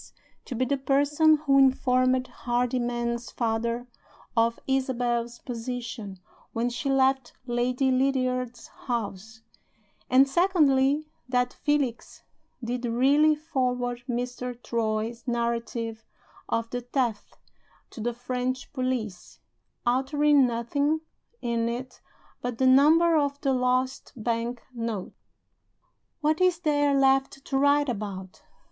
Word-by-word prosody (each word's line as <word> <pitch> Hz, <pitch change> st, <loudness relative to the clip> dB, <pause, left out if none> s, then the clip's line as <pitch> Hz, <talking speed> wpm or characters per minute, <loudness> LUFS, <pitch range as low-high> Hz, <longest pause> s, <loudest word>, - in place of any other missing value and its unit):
to 255 Hz, -, -5 dB
be 255 Hz, +3 st, +1 dB
the 280 Hz, +1 st, -1 dB
person 290 Hz, +3 st, +4 dB
who 275 Hz, -1 st, +5 dB
informed 255 Hz, -1 st, +3 dB
Hardyman's 240 Hz, -1 st, -2 dB
father 235 Hz, +1 st, -1 dB, 0.5 s
of 230 Hz, 0 st, +2 dB
Isabel's 245 Hz, -3 st, -1 dB
position 235 Hz, -5 st, -6 dB, 0.4 s
when 235 Hz, +2 st, 0 dB
she 260 Hz, +4 st, -3 dB
left 265 Hz, -1 st, +2 dB
Lady 250 Hz, +2 st, +1 dB
Lydiard's 255 Hz, -2 st, 0 dB, 0.2 s
house; 220 Hz, -2 st, -4 dB, 0.7 s
and 265 Hz, +2 st, +6 dB
(secondly) 295 Hz, -3 st, +3 dB, 0.2 s
that 250 Hz, -1 st, +1 dB
Felix 285 Hz, -5 st, -2 dB, 0.4 s
did 245 Hz, +1 st, -3 dB
really 280 Hz, +6 st, +4 dB
forward 250 Hz, -5 st, -2 dB
Mr. 245 Hz, 0 st, -3 dB
Troy's 230 Hz, +1 st, -2 dB
narrative 235 Hz, -1 st, -2 dB, 0.5 s
of 230 Hz, 0 st, 0 dB
the 245 Hz, -, -3 dB
theft 245 Hz, -3 st, -2 dB, 0.5 s
to 225 Hz, -, -8 dB
the 240 Hz, +2 st, -1 dB
French 250 Hz, +2 st, -3 dB
police, 255 Hz, -8 st, -3 dB, 0.5 s
altering 275 Hz, +2 st, +3 dB
nothing 285 Hz, +7 st, 0 dB, 0.4 s
in 235 Hz, -1 st, 0 dB
it 250 Hz, +2 st, -6 dB, 0.4 s
but 245 Hz, -2 st, -3 dB
the 260 Hz, -, +2 dB
number 310 Hz, +6 st, +6 dB
of 285 Hz, -2 st, +1 dB
the 270 Hz, -2 st, +1 dB
lost 255 Hz, +1 st, 0 dB
bank 235 Hz, +1 st, -2 dB
note. 230 Hz, -5 st, -4 dB, 1.1 s
What 310 Hz, +3 st, +1 dB
is 365 Hz, -2 st, +4 dB
there 290 Hz, -3 st, +2 dB
left 270 Hz, 0 st, +2 dB
to 270 Hz, -, -1 dB
write 285 Hz, +1 st, +4 dB
about? 200 Hz, -5 st, -5 dB
250 Hz, 110 wpm, -26 LUFS, 235-275 Hz, 1.1 s, and